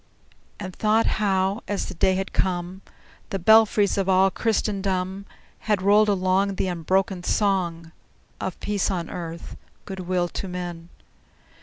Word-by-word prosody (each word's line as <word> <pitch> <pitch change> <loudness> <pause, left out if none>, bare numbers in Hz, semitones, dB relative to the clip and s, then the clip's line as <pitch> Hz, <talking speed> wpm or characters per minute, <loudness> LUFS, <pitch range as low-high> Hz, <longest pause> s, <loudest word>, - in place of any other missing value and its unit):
And 185 -3 -7
thought 220 +1 +2
how, 195 +1 +1
as 205 - -2
the - - -7
day 185 +2 +2
had 190 +1 -3
come, 180 0 -1 0.5
The 195 - -2
belfries 210 0 +4
of 195 -1 0
all 190 +1 +4
Christendom 195 -3 -1 0.3
Had 210 -4 0
rolled 210 +2 +5
along 195 0 +1
The 190 - -1
unbroken 185 +2 0
song 175 -4 0 0.5
Of 185 - -4
peace 205 -2 -1
on 175 -4 -3
earth, 170 -1 -7 0.3
good 190 -1 -7
will 180 -1 0
to 195 - -5
men! 175 -2 -6
190 Hz, 140 wpm, -24 LUFS, 180-200 Hz, 0.5 s, rolled